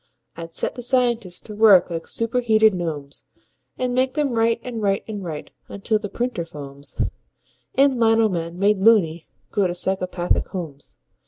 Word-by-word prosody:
I'd 165 0 -8
set - - -2
the 245 - -7
scientists 235 -7 0
to 210 - -9
work 205 -5 +6
like 165 -1 -4
superheated 225 -2 +2
gnomes, 155 -6 -5 0.5
And 250 -1 -1
make 255 +1 +1
them 295 -3 +1
write 230 0 +2
and 235 -3 -5
write 195 -1 +1
and 210 -3 -5
write 155 -4 -6 0.2
until 210 +2 -1
the 210 -1 -6
printer 240 -7 -2
foams 140 -3 -10 0.8
And 270 -2 +3
lino 225 -1 +4
men, 170 -3 -4
made 200 +1 +2
"loony", 190 -6 +3 0.2
go 200 -2 +2
to 175 - -4
psychopathic 185 -1 -1
homes. 160 -7 -8
205 Hz, 160 wpm, -22 LUFS, 170-230 Hz, 0.8 s, work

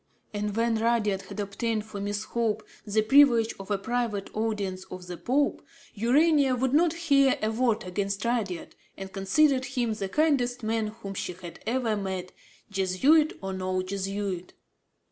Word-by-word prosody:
And, 210 0 -2
when 230 -1 +2
Rudyard 220 -4 +1
had - - -9
obtained 215 +2 -2
for 210 -2 -7
Miss 205 +1 -2
Hope 220 -2 -1 0.2
the 215 +1 +2
privilege 235 -2 +5
of 195 - -9
a 205 - +1
private 225 -1 -2
audience 205 -4 -2
of 185 -1 -9
the 180 0 -6
Pope, 275 +10 0 0.3
Urania 275 +4 +3
would 260 +1 0
not 325 +2 +4
hear 280 -6 +3
a 215 - +1
word 230 -1 +1
against 195 +3 -2
Rudyard 215 -8 -2 0.2
and 190 0 -8
considered 260 +8 +3
him 245 -4 -1
the 195 -2 -4
kindest 255 -4 +1
man 220 0 0
whom 215 -2 -7
she 180 - -4
had 175 -1 -10
ever 235 -2 +1
met, 190 -2 -4 0.4
Jesuit 205 - +3
or 190 0 -3
no 185 0 -1
Jesuit. 195 -1 -4
215 Hz, 160 wpm, -27 LUFS, 195-245 Hz, 0.4 s, privilege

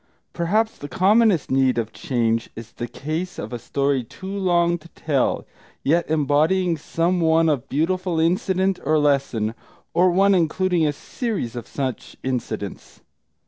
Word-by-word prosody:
Perhaps 215 +6 0
the 145 - -6
commonest 200 - +3
need 130 -2 +3
of 115 -1 -2
change 115 -7 -1
is 115 -1 -9
in - - -31
the 120 - -3
case 155 +9 -4
of - - -6
a 120 - -4
story 140 +2 0
too 190 - -8
long 175 -3 +2
to 165 - -15
tell, 140 -5 0 0.4
yet 165 +4 +2
embodying 160 +4 +2
some 165 +3 0
one 160 -1 +4
beautiful 175 +3 0
incident 185 +3 +1
or 155 - +2
lesson; 140 -7 +1 0.4
or 180 +1 +4
one 195 +3 +4
including 175 -1 +2
a - - +2
series 200 - -4
of 120 - -6
such 130 -4 -4
incidents. 115 -6 -4
160 Hz, 145 wpm, -22 LUFS, 135-185 Hz, 0.4 s, one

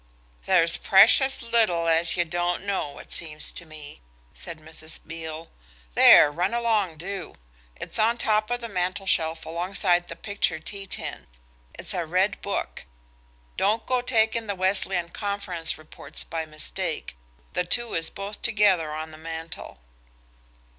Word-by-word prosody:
"There's 170 -3 +4
precious 240 +7 +5
little 220 -8 +2
as 165 +1 +3
ye 175 - +3
don't 175 +2 -1
know, 190 -8 -2
it - - -12
seems 155 -2 -2
to 170 - -7
me," 150 - -11 0.3
said 170 -2 -7
Mrs. 160 0 -8
Beale. 160 0 -7 0.4
"There, 145 - +8
run 180 +8 -1
along 215 -8 +1
do. 190 +2 -6 0.4
It's - - -3
on 230 +2 +3
top 215 -2 +1
of 245 0 -2
the 235 - -4
mantelshelf 180 -4 0
alongside 175 +1 +1
the - - -7
picture 200 -5 -1
tea 195 +5 -7
tin. - - -5 0.5
It's - - -1
a 175 - -1
red 185 +4 +1
book. 200 - -4 0.7
Don't 215 +3 +1
go 255 -1 +1
taking 225 -2 +1
the 200 - -2
Wesleyan 185 -2 +1
Conference 185 -4 -3
Reports 155 0 -9
by 160 -1 -4
mistake, 155 - -4 0.4
the - - +1
two 235 +6 +1
is 165 0 0
both 200 +1 -7
together 205 -8 +3
on 155 +1 -5
the 155 - -12
mantel." 160 - -8
180 Hz, 145 wpm, -25 LUFS, 160-205 Hz, 0.7 s, There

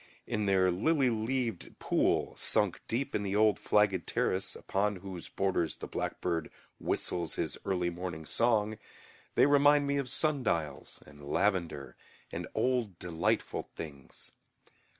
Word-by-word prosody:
In 105 -1 -1
their 95 -1 +4
lily 130 - +2
leaved 115 -2 -2
pool, - - +1
sunk - - +1
deep 135 +4 -1
in - - 0
the 100 -1 -2
old 105 -2 +4
flagged 100 -5 +2
terrace, 95 +1 0
upon 100 +1 0
whose 90 -2 -8
borders 95 -4 0
the - - -7
blackbird 80 -2 -2 0.3
whistles 85 - -1
his - - -2
early 90 -2 0
morning 85 -2 -5
song, 110 -1 +1 0.6
they - - +6
remind 145 0 +5
me 140 0 +1
of 135 -2 -1
sundials 120 - -1
and 75 +1 -15
lavender 85 -8 0 0.4
and - - -4
old 120 -8 +1
delightful 85 -2 -1
things. 70 -4 -8
100 Hz, 130 wpm, -31 LUFS, 85-120 Hz, 0.6 s, they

